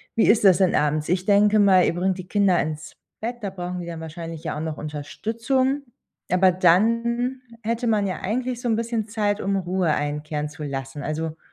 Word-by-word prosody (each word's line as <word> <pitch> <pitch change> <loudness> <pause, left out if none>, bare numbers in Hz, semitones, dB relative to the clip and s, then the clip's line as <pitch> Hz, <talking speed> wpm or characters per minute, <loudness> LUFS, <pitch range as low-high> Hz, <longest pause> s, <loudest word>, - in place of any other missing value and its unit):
wie 225 - +3
ist 215 -1 +4
das 185 -3 +7
denn 185 -2 +3
abends? 150 +1 +1
Ich 180 +1 0
denke 210 +1 +4
mal, 190 -3 +5
ihr - - +1
bringt 185 +1 0
die 180 - -8
Kinder 195 -4 +3
ins 155 -1 -5 0.3
Bett, 240 +2 -3
da 200 - -3
brauchen 180 -1 -5
die 170 - -7
dann 165 -1 -6
wahrscheinlich 165 0 -7
ja - - -3
auch - - -4
noch 160 -2 -4
Unterstützung, 230 - -2 0.5
aber 185 0 +5
dann 230 +8 +2 0.2
hätte 230 +2 -1
man 210 -3 +2
ja 185 - -4
eigentlich 245 +4 -2
so 245 - -3
‘n 225 - +3
bisschen 230 -2 -2
Zeit, 210 -1 -1
um 195 0 0
Ruhe 180 -3 0
einkehren 150 +1 -3
zu 150 0 -9
lassen. 135 0 -5
Also, 160 +1 -3
185 Hz, 205 wpm, -23 LUFS, 160-220 Hz, 0.5 s, das